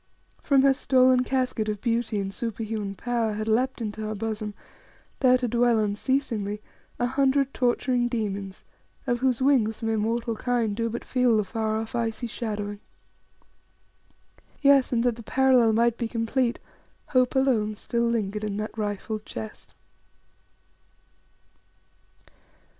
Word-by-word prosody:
From 275 Hz, -2 st, +3 dB
her 275 Hz, -1 st, +6 dB
stolen 255 Hz, -2 st, +4 dB
casket 255 Hz, -4 st, -1 dB
of 210 Hz, -1 st, -3 dB
beauty 230 Hz, -2 st, -1 dB
and 195 Hz, 0 st, -3 dB
super 230 Hz, 0 st, -4 dB
human 210 Hz, -2 st, -4 dB
power 230 Hz, 0 st, -1 dB
had 215 Hz, +1 st, -4 dB
leapt 250 Hz, +3 st, +1 dB
into 215 Hz, -1 st, -4 dB
her 215 Hz, 0 st, -3 dB
bosom, 215 Hz, -1 st, -4 dB, 0.6 s
there 255 Hz, -2 st, +5 dB
to 250 Hz, -1 st, -2 dB
dwell 240 Hz, 0 st, +3 dB
unceasingly, 210 Hz, -1 st, -1 dB, 0.4 s
a 245 Hz, -, 0 dB
hundred 270 Hz, +1 st, +1 dB
torturing 245 Hz, 0 st, +1 dB
demons, 200 Hz, -5 st, -4 dB, 0.4 s
of 240 Hz, -3 st, 0 dB
whose 260 Hz, -1 st, +1 dB
wings 235 Hz, -6 st, +2 dB
mere 225 Hz, -1 st, 0 dB
mortal 230 Hz, +1 st, -1 dB
kind 230 Hz, -2 st, 0 dB
do 230 Hz, +1 st, -1 dB
but 235 Hz, +2 st, -5 dB
feel 250 Hz, -3 st, +2 dB
the 210 Hz, -, +2 dB
far 220 Hz, +2 st, -2 dB
off, 220 Hz, 0 st, -5 dB
icy 230 Hz, 0 st, -2 dB
shadowing. 210 Hz, -3 st, -4 dB, 1.8 s
Yes; 280 Hz, -2 st, +5 dB
and 235 Hz, -2 st, +1 dB
that 245 Hz, -2 st, +1 dB
the -, -, -8 dB
parallel 255 Hz, -1 st, +4 dB
might 235 Hz, +1 st, +2 dB
be 235 Hz, -, -1 dB
complete, 235 Hz, +2 st, 0 dB, 0.5 s
Hope 255 Hz, -1 st, +2 dB
alone 235 Hz, -6 st, +2 dB
still 235 Hz, +2 st, -1 dB
lingered 215 Hz, -2 st, -1 dB
in 205 Hz, -1 st, -2 dB
that 215 Hz, 0 st, -4 dB
rifled 210 Hz, 0 st, -3 dB
chest. 110 Hz, -, -9 dB
230 Hz, 140 wpm, -26 LUFS, 215-250 Hz, 1.8 s, her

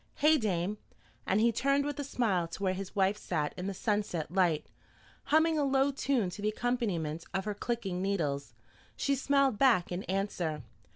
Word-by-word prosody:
Hey, 305 Hz, +1 st, +4 dB
dame?" 200 Hz, -1 st, -1 dB, 0.5 s
And 195 Hz, -, +3 dB
he 235 Hz, +2 st, +4 dB
turned 275 Hz, +4 st, +1 dB
with 290 Hz, 0 st, -3 dB
a -, -, -1 dB
smile 215 Hz, -11 st, 0 dB
to 170 Hz, +4 st, -7 dB
where 185 Hz, -1 st, +2 dB
his 190 Hz, 0 st, -6 dB
wife 195 Hz, +1 st, +2 dB
sat 155 Hz, -7 st, -2 dB
in 180 Hz, +1 st, -4 dB
the 200 Hz, -, -2 dB
sunset 200 Hz, -7 st, -1 dB
light, 175 Hz, -5 st, +2 dB, 0.6 s
humming 315 Hz, +2 st, +3 dB
a -, -, +2 dB
low 270 Hz, 0 st, +3 dB
tune 265 Hz, -8 st, 0 dB
to 205 Hz, -, -8 dB
the 210 Hz, -, +1 dB
accompaniment 205 Hz, -10 st, -1 dB
of 190 Hz, 0 st, -1 dB
her 210 Hz, -, -1 dB
clicking 205 Hz, -4 st, -3 dB
needles. 145 Hz, -, -1 dB, 0.4 s
She 280 Hz, -, +1 dB
smiled 275 Hz, -3 st, +2 dB
back 235 Hz, -12 st, +4 dB
in 175 Hz, +1 st, -2 dB
answer. 180 Hz, -6 st, -2 dB
205 Hz, 180 wpm, -31 LUFS, 180-265 Hz, 0.6 s, Hey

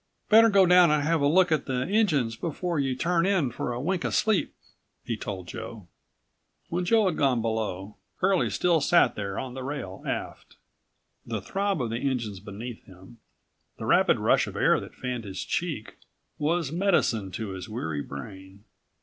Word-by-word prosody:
"Better 225 Hz, +1 st, +7 dB
go 195 Hz, -2 st, +5 dB
down 180 Hz, -1 st, +6 dB
and 150 Hz, -1 st, +2 dB
have 160 Hz, 0 st, +1 dB
a 140 Hz, -, +3 dB
look 180 Hz, +3 st, +4 dB
at 155 Hz, -3 st, +1 dB
the 130 Hz, -1 st, -1 dB
engines 160 Hz, -, +1 dB
before 170 Hz, +3 st, -3 dB
you 135 Hz, -2 st, 0 dB
turn 170 Hz, +5 st, +1 dB
in 180 Hz, -11 st, +1 dB
for 120 Hz, -, -3 dB
a 120 Hz, -, -3 dB
wink 175 Hz, +6 st, -1 dB
of -, -, -1 dB
sleep," 220 Hz, -4 st, +1 dB, 0.5 s
he 115 Hz, -, -3 dB
told 95 Hz, -4 st, -6 dB
Joe. 110 Hz, -5 st, -8 dB, 0.8 s
When 175 Hz, +1 st, -1 dB
Joe 220 Hz, +3 st, +4 dB
had 180 Hz, -4 st, 0 dB
gone 135 Hz, -4 st, +2 dB
below, 110 Hz, -3 st, -3 dB, 0.2 s
Curlie 190 Hz, -1 st, +2 dB
still 170 Hz, -3 st, +2 dB
sat 170 Hz, +4 st, +4 dB
there 100 Hz, -2 st, -4 dB
on 130 Hz, -2 st, -4 dB
the 130 Hz, -, -6 dB
rail 130 Hz, -9 st, -5 dB
aft. -, -, -5 dB, 0.7 s
The 115 Hz, -2 st, -4 dB
throb 195 Hz, -, -1 dB
of 115 Hz, -, -3 dB
the 115 Hz, -, -2 dB
engines 120 Hz, -8 st, -2 dB
beneath 105 Hz, +4 st, -8 dB
him, 95 Hz, +5 st, -16 dB, 0.6 s
the -, -, -6 dB
rapid -, -, +4 dB
rush -, -, +2 dB
of -, -, -8 dB
air -, -, +3 dB
that -, -, -10 dB
fanned 125 Hz, -2 st, -4 dB
his 95 Hz, -1 st, -5 dB
cheek, -, -, -3 dB, 0.4 s
was 155 Hz, -1 st, 0 dB
medicine 165 Hz, -, +1 dB
to 110 Hz, -2 st, -4 dB
his 95 Hz, 0 st, -7 dB
weary 80 Hz, -10 st, -3 dB
brain. 95 Hz, +8 st, -10 dB
130 Hz, 180 wpm, -27 LUFS, 110-175 Hz, 0.8 s, Better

